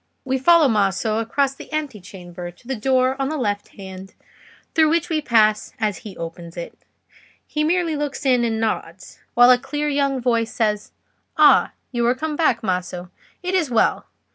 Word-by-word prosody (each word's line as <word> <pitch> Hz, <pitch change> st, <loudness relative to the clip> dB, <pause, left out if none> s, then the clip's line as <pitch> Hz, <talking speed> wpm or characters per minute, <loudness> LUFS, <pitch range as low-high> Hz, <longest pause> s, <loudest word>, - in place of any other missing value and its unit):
We 265 Hz, 0 st, 0 dB
follow 330 Hz, +2 st, +5 dB
Maso 215 Hz, 0 st, +1 dB
across 265 Hz, +4 st, 0 dB
the 275 Hz, -, -13 dB
ante 295 Hz, -9 st, -3 dB
chamber 175 Hz, -1 st, -9 dB
to 175 Hz, +7 st, -18 dB
the 265 Hz, -, -2 dB
door 260 Hz, +2 st, +1 dB
on 270 Hz, -, 0 dB
the 310 Hz, -, -2 dB
left 205 Hz, -5 st, -2 dB
hand, 190 Hz, -1 st, -10 dB, 0.6 s
through 315 Hz, -1 st, +4 dB
which 335 Hz, +1 st, 0 dB
we 315 Hz, -2 st, 0 dB
pass 215 Hz, -5 st, +2 dB
as 210 Hz, -3 st, -1 dB
he 205 Hz, -3 st, -10 dB
opens 170 Hz, +1 st, -8 dB
it. 170 Hz, -, -6 dB, 0.7 s
He 300 Hz, -, -2 dB
merely 335 Hz, 0 st, +1 dB
looks 290 Hz, -1 st, -4 dB
in 250 Hz, -2 st, +3 dB
and 225 Hz, -1 st, -1 dB
nods, 220 Hz, -1 st, -4 dB, 0.2 s
while 245 Hz, +1 st, +7 dB
a 250 Hz, -, +5 dB
clear 295 Hz, +4 st, -3 dB
young 280 Hz, -2 st, 0 dB
voice 230 Hz, -2 st, 0 dB
says, 210 Hz, -2 st, -1 dB, 0.5 s
"Ah, -, -, +5 dB, 0.2 s
you 240 Hz, -2 st, -1 dB
are 245 Hz, -, +3 dB
come 310 Hz, +2 st, -3 dB
back, 275 Hz, -8 st, +1 dB
Maso. 180 Hz, -2 st, -3 dB, 0.3 s
It 360 Hz, +1 st, -2 dB
is 345 Hz, -7 st, +1 dB
well. 230 Hz, -2 st, +1 dB
240 Hz, 180 wpm, -21 LUFS, 205-290 Hz, 0.7 s, while